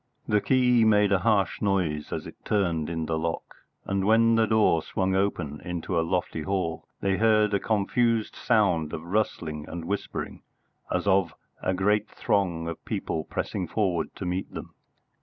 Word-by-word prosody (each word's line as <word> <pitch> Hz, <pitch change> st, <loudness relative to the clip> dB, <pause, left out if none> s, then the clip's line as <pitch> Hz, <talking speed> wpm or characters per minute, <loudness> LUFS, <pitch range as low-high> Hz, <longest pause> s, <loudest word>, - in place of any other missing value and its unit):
The 105 Hz, -1 st, +2 dB
key 125 Hz, -3 st, +4 dB
made 105 Hz, -2 st, +4 dB
a 100 Hz, -, +4 dB
harsh 100 Hz, -1 st, +1 dB
noise 90 Hz, -7 st, 0 dB
as -, -, -4 dB
it -, -, -12 dB
turned 85 Hz, -7 st, 0 dB
in 80 Hz, -1 st, -2 dB
the 80 Hz, 0 st, -1 dB
lock, 85 Hz, +1 st, -4 dB, 0.3 s
and 100 Hz, -1 st, -1 dB
when 115 Hz, +3 st, +4 dB
the 115 Hz, -1 st, +3 dB
door 110 Hz, -7 st, +3 dB
swung 95 Hz, +4 st, -1 dB
open 90 Hz, -7 st, -1 dB
into 90 Hz, 0 st, -2 dB
a -, -, +3 dB
lofty 85 Hz, -1 st, -1 dB
hall 90 Hz, -2 st, -2 dB
they 95 Hz, -1 st, +1 dB
heard 110 Hz, -2 st, +3 dB
a 100 Hz, -, +3 dB
confused 110 Hz, +2 st, +1 dB
sound 90 Hz, -10 st, +1 dB
of 80 Hz, -, -4 dB
rustling 85 Hz, -5 st, -2 dB
and 85 Hz, 0 st, -6 dB
whispering, 100 Hz, +3 st, -4 dB, 0.5 s
as 90 Hz, 0 st, 0 dB
of 95 Hz, -5 st, +2 dB, 0.3 s
a 95 Hz, -, 0 dB
great 105 Hz, +3 st, +1 dB
throng 85 Hz, -5 st, 0 dB
of 85 Hz, -, -6 dB
people 80 Hz, -1 st, -3 dB
pressing 95 Hz, -4 st, -3 dB
forward 90 Hz, -6 st, -1 dB
to 95 Hz, -, -6 dB
meet 90 Hz, +2 st, -3 dB
them. -, -, -8 dB
95 Hz, 170 wpm, -26 LUFS, 85-105 Hz, 0.5 s, key